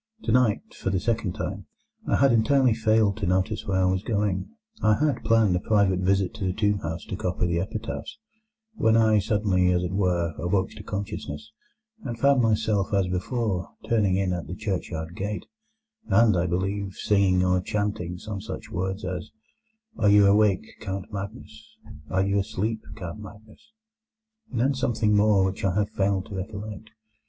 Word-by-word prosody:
Tonight, 125 -5 +2
for - - -3
the 95 -1 +1
second 110 -3 -1
time, - - -5 0.4
I - - +2
had 135 0 +4
entirely 130 +2 +4
failed 110 -2 +2
to 100 -4 -2
notice 95 +4 0
where 95 -1 +1
I 90 - +3
was 95 -1 0
going 100 -4 -1 0.3
(I 110 0 +4
had 145 0 0
planned 110 -5 +3
a - - +1
private 100 -2 +2
visit 95 0 +1
to 110 -3 -6
the 95 -1 0
tomb 105 0 +1
house 80 -1 -5
to - - -5
copy 90 -3 -1
the 85 -1 0
epitaphs), 110 +4 -5 0.6
when 110 - +3
I 110 -1 +4
suddenly, 100 -4 +2
as 90 0 +1
it 90 - -2
were, 90 -4 0
awoke 95 +2 0
to - - -10
consciousness, 95 -8 -5 0.5
and 120 -2 -4
found 140 +1 +4
myself 110 -3 +1
(as 95 -2 +1
before) 95 0 -2 0.2
turning 105 -5 +2
in 95 -1 0
at 85 -1 -4
the 90 - -5
churchyard 90 -5 -4
gate, 105 +2 -4 0.6
and, 110 0 +4
I 90 +1 +1
believe, 95 +2 -2
singing 95 -3 +2
or 90 0 +2
chanting 100 -3 -2
some 100 +1 -6
such 110 +1 -7
words 95 0 -3
as, 90 -2 -4 0.7
'Are 105 - +4
you 105 0 +6
awake, 105 0 +4
Count 95 -1 -5
Magnus? 100 - -8 0.3
Are 95 +1 +1
you 100 +1 +1
asleep, 110 +2 -2
Count 90 +2 -7
Magnus?' 110 - -13 0.8
and 120 -4 -2
then 135 +3 +3
something 115 -5 +1
more 105 -2 +4
which 95 0 -3
I 95 -2 +1
have 105 0 0
failed 95 -1 0
to 100 - -8
recollect. 105 +2 -6
100 Hz, 175 wpm, -25 LUFS, 95-110 Hz, 0.8 s, you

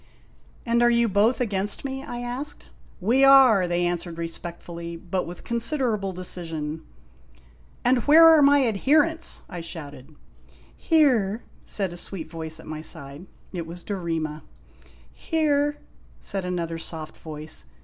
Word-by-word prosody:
"And 235 0 +2
are 240 - +5
you 235 0 +3
both 210 +4 +2
against 205 -1 -1
me?' 270 0 -4
I 245 -4 -6
asked. 250 +5 -4 0.3
"We 235 +8 +3
are!" 260 -9 +7
they 175 0 0
answered 175 -1 -3
respectfully, 170 0 -7
but 180 +2 -3
with 175 +1 -9
considerable 235 -4 0
decision. 165 -4 -4 1.0
"And 250 +1 +4
where 320 +3 +9
are 320 -2 +7
my 285 -1 +5
adherents?' 305 - +2
I 175 -3 -7
shouted. 150 -4 -9 0.3
" - - -27 0.2
Here! 245 - +2
" - - -27
said 190 -4 -1
a - - -8
sweet 170 -3 -6
voice 160 -1 -5
at - - -12
my 155 0 -6
side. 155 +1 -5 0.3
It 170 -3 -4
was 170 +1 -8
Dorema. 165 -6 -3 0.4
" - - -26 0.2
Here! 295 -2 0 0.2
" - - -28
said 195 -2 -3
another 170 -2 -3
soft 160 -1 -6
voice. 155 - -6
190 Hz, 150 wpm, -25 LUFS, 165-250 Hz, 1.0 s, where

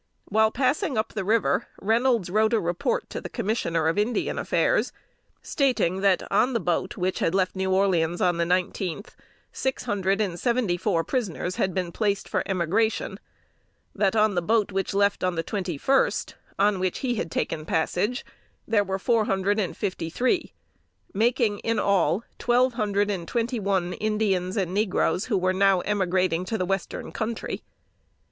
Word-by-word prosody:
While 220 +1 +4
passing 260 +1 0
up 215 - -1
the 210 - -2
river, 220 +3 +1
Reynolds 225 -3 +1
wrote 215 +3 +2
a 225 - +4
report 175 - -1
to - - -4
the - - -7
Commissioner 190 -8 -1
of 165 +5 +1
Indian 225 +3 0
Affairs, - - +1 0.5
stating 245 - +1
that 195 -2 +3
on 255 - +3
the 230 - +1
boat 185 +3 -1
which 185 0 -1
left 185 +2 +1
New 190 0 -1
Orleans 180 -3 +2
on 175 -1 +2
the 170 - +2
nineteenth, 180 +2 -2 0.4
six 265 -1 -2
hundred 195 0 0
and 185 -5 -1
seventy 235 -7 +1
four 175 -2 0
prisoners 185 - -2
had 185 -2 0
been 180 -2 -1
placed 200 +1 -1
for - - 0
emigration; 195 +5 0 0.7
that 200 0 +1
on 215 -1 +3
the 175 - +1
boat 215 +3 +1
which 195 0 -2
left 200 0 +2
the 175 -3 -1
twenty 185 -6 -3
first, 270 - +1 0.2
on 200 -1 +2
which 185 -1 -1
he 245 - +1
had 200 -7 -3
taken 155 -1 -2
passage, 180 +10 -1 0.4
there 215 -2 +3
were 190 -1 -2
four 225 +2 +2
hundred 195 +2 +1
and 190 -4 -2
fifty 185 -5 -3
three 255 - 0 0.6
making 225 -1 +1
in 230 -1 -1
all 200 +1 +2 0.2
twelve 245 +1 +3
hundred 205 -2 0
and 175 -4 -4
twenty 235 +1 -1
one 190 -3 0
Indians 210 -3 0
and 185 -3 -1
negroes, 200 -2 +1
who 215 -6 0
were 185 0 +1
now 195 -1 +3
emigrating 185 -3 0
to 220 +4 -2
the 185 - -1
Western 195 0 -3
Country. 230 0 -4
200 Hz, 165 wpm, -25 LUFS, 185-220 Hz, 0.7 s, While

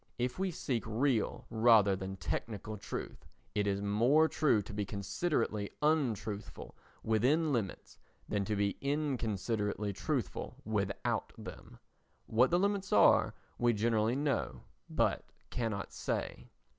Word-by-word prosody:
If 125 +5 -2
we 190 0 +1
seek 130 -8 -2
real 115 +1 0
rather 110 -4 +5
than 95 0 -5
technical 105 +2 -4
truth, 100 - -7 0.3
it 105 -1 +1
is 100 0 0
more 120 +10 +4
true 140 -10 +2
to 105 - -9
be 105 0 -1
considerately 105 - -1
untruthful 115 -9 -1 0.3
within 140 +8 +2
limits 110 -7 -3 0.3
than 105 -1 0
to 105 - -1
be 100 0 0
inconsiderately 110 -8 -1
truthful 125 - -3
without 100 -2 -1
them. - - -10 0.5
What 120 +4 +3
the 175 - +3
limits 200 +1 0
are - - +5 0.2
we 120 -1 +3
generally 110 +1 +2
know 125 - -1 0.3
but - - +1 0.3
cannot 110 -5 -3
say. - - -3
110 Hz, 125 wpm, -33 LUFS, 100-140 Hz, 0.5 s, rather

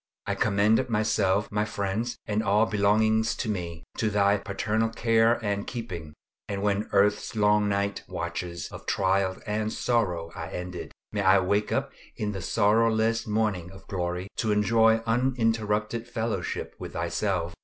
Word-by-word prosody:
I - - -1
commend 105 +5 +2
myself, 105 -2 +1
my 105 0 +1
friends, 105 +3 -2
and 105 0 0
all 105 +1 +3
belonging 110 +1 +3
to 110 +2 -2
me, 85 -5 -4
to 110 - +1
Thy 100 -1 +3
paternal 105 +3 -1
care 115 0 +3
and 100 0 -1
keeping; 90 -11 -6 0.3
and 100 0 -3
when 105 +1 0
earth's 105 +2 +2
long 105 -1 +3
night 100 0 -1
watches 85 -2 -4
of - - -10
trial 95 0 +1
and 110 0 -1
sorrow 90 -11 0
are - - -6
ended, 90 0 -6 0.2
may 105 - -1
I 95 0 +6
wake 100 +2 +1
up - - 0 0.2
in 105 -1 -2
the 95 -2 -5
sorrowless 110 +3 +2
morning 105 -5 0
of 95 +1 -14
glory, 90 0 -3
to 110 - 0
enjoy 110 +2 +4
uninterrupted 115 -2 0
fellowship 110 -6 -3
with - - -7
Thyself. 85 0 -1
105 Hz, 150 wpm, -27 LUFS, 95-110 Hz, 0.3 s, I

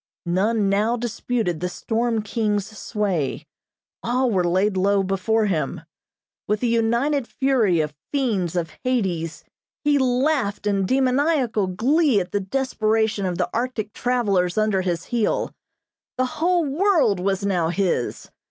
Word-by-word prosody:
None 200 +4 +1
now 210 +5 +1
disputed 230 -6 -2
the 180 +2 -2
storm 225 +3 -1
king's 210 -2 -1
sway. 195 - -2 0.6
All 250 +1 +1
were 185 -3 +2
laid 190 +4 +1
low 195 +1 +2
before 195 +4 +1
him. 165 -6 -1 0.7
With 210 0 +1
the 245 - +1
united 235 +4 +1
fury 230 -11 +2
of 150 -1 -3 0.2
fiends 215 - 0
of 165 -3 -1
Hades, 190 -11 -1 0.4
he 295 -1 +3
laughed 255 -5 +1
in 200 -2 +1
demoniacal 260 - +2
glee 260 - +2
at 180 - -4
the 205 - 0
desperation 220 -2 0
of 180 -1 -2
the - - 0
Arctic 230 -3 -2
travelers 200 -8 0
under 215 -3 +2
his 175 -2 -2
heel. 235 -3 -1 0.6
The 255 - +2
whole 340 +5 +1
world 290 - +2
was 195 +1 -1
now 175 -5 +1
his. 175 -8 -1
215 Hz, 135 wpm, -23 LUFS, 190-250 Hz, 0.7 s, he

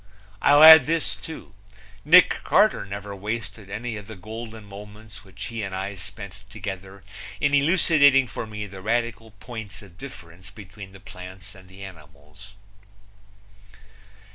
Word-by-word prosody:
I'll 145 +1 +6
add 160 -4 +10
this 165 +1 0
too: 160 -9 -10 0.5
Nick 175 +5 +6
Carter 210 - +3
never 100 0 -7
wasted 105 0 -6
any 110 +2 -5
of 105 -2 -10
the 110 - -9
golden 110 +2 -9
moments 105 +1 -12
which 95 +1 -11
he 115 -1 -5
and 95 -2 -5
I 95 +2 -4
spent 100 +1 -10
together 95 -2 -8 0.4
in 145 0 +1
elucidating 140 -3 +4
for 115 - -7
me 105 -1 -6
the 95 -1 -11
radical 115 +1 -2
points 105 -1 -9
of 90 -2 -18
difference 95 -7 -12
between 100 -2 -12
the 95 - -14
plants 95 0 -12
and 95 -1 -17
the 95 +1 -12
animals. 80 +2 -14
105 Hz, 140 wpm, -24 LUFS, 95-115 Hz, 0.5 s, add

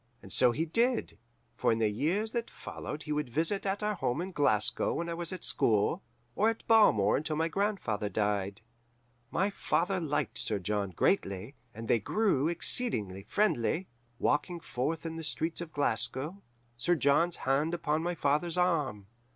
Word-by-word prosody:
And - - -8
so 125 -1 +5
he 155 +7 -1
did, 235 +9 0 0.4
for - - +2
in 115 - +1
the 110 -1 +2
years 170 - 0
that 235 -1 -3
followed 150 +1 -7
he 150 - -6
would 150 -3 -1
visit 165 - 0
at 195 +2 -1
our 210 0 +1
home 125 -9 -1
in 185 +2 -3
Glasgow 110 - +2
when 170 - -2
I 170 - -3
was 170 +1 -5
at 185 - -6
school, 105 -2 +2 0.3
or 215 +2 +3
at 225 - -4
Balmore 110 - +5
until 155 +1 -2
my 160 +2 +1
grandfather 165 - -1
died. 100 0 -1 0.7
"My 190 +8 0
father 185 0 0
liked 140 - -2
Sir 105 - 0
John 100 +1 -1
greatly, 100 - 0 0.2
and 115 -1 -8
they 115 - +3
grew 175 - +1
exceedingly 165 - 0
friendly, 170 - 0 0.3
walking 160 +7 0
forth 155 +2 -3
in 165 0 -4
the 165 - -5
streets 160 +2 -2
of 170 -2 -6
Glasgow, 145 - 0 0.3
Sir 175 +9 +1
John's 165 +4 +3
hand 145 +6 0
upon 155 -2 0
my 175 +1 -2
father's 155 +4 0
arm. 150 - +1
155 Hz, 170 wpm, -30 LUFS, 115-180 Hz, 0.7 s, so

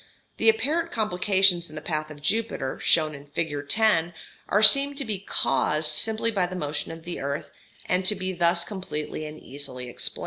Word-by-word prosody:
The - - +4
apparent 335 -6 +1
complications 190 - +2
in 155 - -12
the - - -4
path 155 -1 -3
of 145 -1 -12
Jupiter, 210 -7 -1
shown 155 -2 +2
in 145 0 -11
Fig. 145 +1 -2
10, 175 -5 +3 0.3
are 210 +2 +3
seen 280 +5 +6
to 275 - -3
be 210 -4 -3
caused 150 -3 0
simply 220 +7 +2
by 190 -4 +1
the 185 - -7
motion 150 -3 -3
of 165 0 -9
the 175 +1 -6
earth, 140 +1 -4 0.3
and 180 +1 0
to 210 - +4
be 185 0 -3
thus 170 0 +2
completely 155 -5 -5
and 155 +1 -9
easily 125 -2 -7
explained. - - -4
175 Hz, 185 wpm, -25 LUFS, 150-210 Hz, 0.3 s, seen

